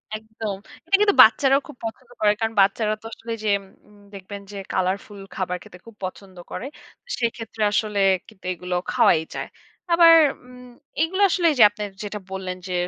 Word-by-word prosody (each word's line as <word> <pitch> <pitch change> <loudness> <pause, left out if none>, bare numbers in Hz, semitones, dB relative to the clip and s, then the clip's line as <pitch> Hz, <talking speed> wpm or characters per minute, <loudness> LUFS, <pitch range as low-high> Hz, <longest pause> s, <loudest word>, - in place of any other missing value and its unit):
একদম। 220 -1 -6 0.3
এটা 390 - +3
কিন্তু 410 -1 +4
বাচ্চারাও 270 +5 +4
খুব 295 - -12
পছন্দ 240 +2 -7
করে। 210 -1 +4
কারণ, 225 0 -1
বাচ্চারা 210 +2 +2
তো - - -17
আসলে 230 +1 -8
যেম 200 -2 +1 0.3
উম 210 -1 -20
দেখবেন 200 +1 -9
যে, 200 - -8 0.2
কালারফুল 195 +2 -2 0.2
খাবার 180 -1 -2
খেতে 180 - -14
খুব 230 -2 -14
পছন্দ 185 0 -9
করে। - - -5 0.5
সেক্ষেত্রে 225 -2 -3
আসলে 210 -1 0 0.3
কিন্তু 210 -4 -18
এগুলো 180 0 -5 0.2
খাওয়াই 160 - +4
যায়। - - -4 0.5
আবার 335 -1 +8 0.3
উম 250 0 -14 0.3
এইগুলা 375 +5 +1
আসলে 350 -1 0
এই 295 - -2
যে - - +9
আপনে 210 0 -7 0.2
যেটা 210 0 -5
বললেন 185 -1 -5
যে, 185 - -4
215 Hz, 170 wpm, -23 LUFS, 195-240 Hz, 0.5 s, যে